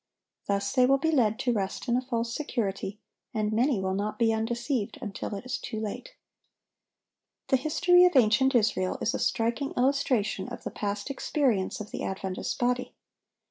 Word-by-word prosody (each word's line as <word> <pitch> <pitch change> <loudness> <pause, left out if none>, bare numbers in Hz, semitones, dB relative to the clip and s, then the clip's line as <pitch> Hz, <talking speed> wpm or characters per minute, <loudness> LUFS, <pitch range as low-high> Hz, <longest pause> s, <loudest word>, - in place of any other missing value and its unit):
Thus 200 0 0
they 250 -1 +5
will 275 +1 +5
be 320 +4 0
led 225 -7 +2
to 245 - +1
rest 195 -3 -3
in 240 - +2
a 250 - +2
false 235 -2 -2
security, 205 -8 -3 0.4
and 215 0 0
many 240 0 +2
will 190 0 -1
not 205 +2 -2
be 225 -2 +3
undeceived 235 +1 -2
until 205 0 -5
it 200 - -7
is 255 0 -3
too 220 - -5
late. 220 - -6 1.3
The - - +5
history 345 +6 +4
of 360 - +3
ancient 255 +2 +4
Israel 205 -5 +2
is 230 - 0
a - - -2
striking 235 +5 0
illustration 250 -6 +1
of - - -8
the - - -4
past 205 +5 -3
experience 255 -8 0
of 215 - -7
the - - -5
Adventist 190 -1 -3
body. 250 +1 -1
230 Hz, 175 wpm, -28 LUFS, 205-260 Hz, 1.3 s, they